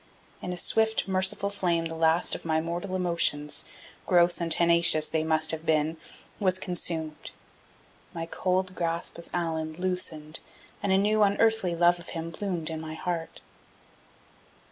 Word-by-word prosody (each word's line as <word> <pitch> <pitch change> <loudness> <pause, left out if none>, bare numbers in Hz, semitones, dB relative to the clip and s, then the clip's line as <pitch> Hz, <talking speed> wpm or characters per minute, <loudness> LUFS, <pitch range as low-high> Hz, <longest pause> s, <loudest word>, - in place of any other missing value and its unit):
In 180 - -4
a 180 - -4
swift, 220 +4 +1
merciful 190 +1 +1
flame 175 -4 0
the 165 - -4
last 160 +1 +2
of - - -5
my 160 -1 0
mortal 175 +4 -4
emotions 170 -5 +1 0.4
gross 175 -1 +4
and 165 -1 -2
tenacious 170 -2 +5
they 160 -1 -1
must 160 0 +2
have 160 -1 -5
been 160 0 +1 0.4
was 185 -2 +2
consumed. 165 -4 -3 0.8
My 165 0 -5
cold 185 +2 -1
grasp 170 -1 -3
of 170 - -13
Allan 160 -2 -2
loosened 165 -3 -2 0.4
and 200 - 0
a 190 - +4
new 210 +2 +2
unearthly 205 -2 +2
love 175 +1 +3
of 170 - -11
him 165 +1 -5
bloomed 170 -3 -4
in 160 0 -5
my 160 0 -7
heart. 170 -1 -5
170 Hz, 150 wpm, -27 LUFS, 160-185 Hz, 0.8 s, tenacious